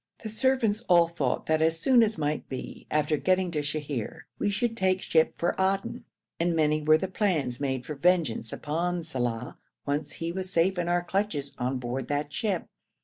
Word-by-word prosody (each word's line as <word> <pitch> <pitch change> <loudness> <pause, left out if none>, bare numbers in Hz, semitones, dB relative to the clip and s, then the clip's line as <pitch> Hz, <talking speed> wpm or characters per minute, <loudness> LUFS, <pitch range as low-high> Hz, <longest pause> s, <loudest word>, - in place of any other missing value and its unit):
The 220 - -4
servants 225 -2 +1
all 170 -1 +6
thought 150 -7 -1
that 155 0 +2
as 160 0 +2
soon 250 +6 +5
as 220 -3 +2
might 150 -1 -2
be 130 - -7
after 150 0 +1
getting 185 +2 +1
to 150 -3 -1
Sheher 145 -5 -4 0.2
we 205 - +1
should 225 +3 0
take 190 -3 +2
ship 160 -3 +2
for 170 - +1
Aden, 195 +1 0 0.3
and 170 0 +1
many 155 -1 +2
were 155 +1 +5
the 190 - -2
plans 180 - 0
made 130 -3 -1
for 150 - -4
vengeance 150 -8 +1
upon 170 +3 -2
Saleh 125 -6 -2 0.3
once 145 +2 -2
he 165 0 -4
was 185 +1 -5
safe 180 +2 +2
in 175 - -1
our 175 0 +2
clutches 175 -7 -2
on 125 +2 0
board 125 +1 -4
that 145 0 -2
ship. 200 -6 -1
165 Hz, 190 wpm, -28 LUFS, 145-190 Hz, 0.3 s, all